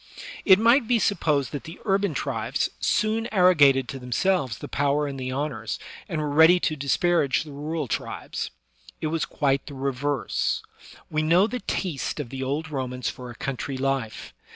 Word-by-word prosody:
It 190 Hz, -2 st, +8 dB
might 230 Hz, +3 st, +4 dB
be 245 Hz, 0 st, +4 dB
supposed 155 Hz, -, +1 dB
that 145 Hz, +2 st, -5 dB
the 165 Hz, +1 st, -9 dB
urban 195 Hz, -5 st, +1 dB
tribes 125 Hz, -2 st, -1 dB
soon 220 Hz, +2 st, +1 dB
arrogated 150 Hz, -, +5 dB
to 135 Hz, -, -5 dB
themselves 130 Hz, -, 0 dB
the -, -, -7 dB
power 145 Hz, +1 st, +1 dB
and 140 Hz, -2 st, -5 dB
the 130 Hz, 0 st, -3 dB
honors, 130 Hz, -5 st, -3 dB, 0.3 s
and 165 Hz, -4 st, -2 dB
were 150 Hz, -, -1 dB
ready 160 Hz, +5 st, +6 dB
to 155 Hz, -, 0 dB
disparage 140 Hz, 0 st, +2 dB
the 155 Hz, -, -11 dB
rural 150 Hz, +1 st, -3 dB
tribes. -, -, -4 dB, 0.5 s
It 155 Hz, -, -2 dB
was 165 Hz, -, 0 dB
quite 140 Hz, -2 st, 0 dB
the 145 Hz, -, -8 dB
reverse. 135 Hz, 0 st, -1 dB, 0.5 s
We 155 Hz, -, +1 dB
know 170 Hz, +5 st, +4 dB
the 250 Hz, +3 st, -3 dB
taste 170 Hz, -, -3 dB
of 140 Hz, -5 st, -4 dB
the 135 Hz, +1 st, -6 dB
old 145 Hz, +4 st, -2 dB
Romans 125 Hz, -3 st, -2 dB
for 125 Hz, -1 st, -9 dB
a 120 Hz, -, -9 dB
country 135 Hz, +1 st, -4 dB
life. 135 Hz, -5 st, -2 dB
145 Hz, 175 wpm, -25 LUFS, 135-175 Hz, 0.5 s, It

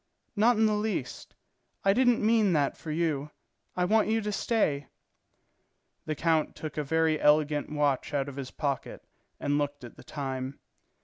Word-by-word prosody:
"Not 225 Hz, +3 st, +4 dB
in 220 Hz, -, +4 dB
the 215 Hz, -, +3 dB
least. 210 Hz, -, -3 dB, 0.5 s
I 195 Hz, -, +5 dB
didn't 245 Hz, -2 st, +3 dB
mean 220 Hz, -4 st, +4 dB
that 145 Hz, -3 st, +1 dB
for 160 Hz, -, -9 dB
you. 155 Hz, -2 st, -1 dB, 0.5 s
I 180 Hz, -, +2 dB
want 215 Hz, +3 st, +3 dB
you 220 Hz, +1 st, +2 dB
to 210 Hz, 0 st, -2 dB
stay." 175 Hz, -, 0 dB, 1.2 s
The 155 Hz, -, -1 dB
count 160 Hz, 0 st, +1 dB
took 155 Hz, -2 st, -6 dB
a 150 Hz, -, -1 dB
very 160 Hz, +1 st, +1 dB
elegant 150 Hz, 0 st, +3 dB
watch 145 Hz, -3 st, 0 dB
out 140 Hz, -1 st, -1 dB
of 140 Hz, -, -7 dB
his 135 Hz, -2 st, -5 dB
pocket 140 Hz, -3 st, -3 dB, 0.4 s
and 145 Hz, +1 st, 0 dB
looked 145 Hz, -1 st, -3 dB
at 120 Hz, -, -11 dB
the -, -, -13 dB
time. 135 Hz, -2 st, -5 dB
155 Hz, 170 wpm, -28 LUFS, 145-210 Hz, 1.2 s, I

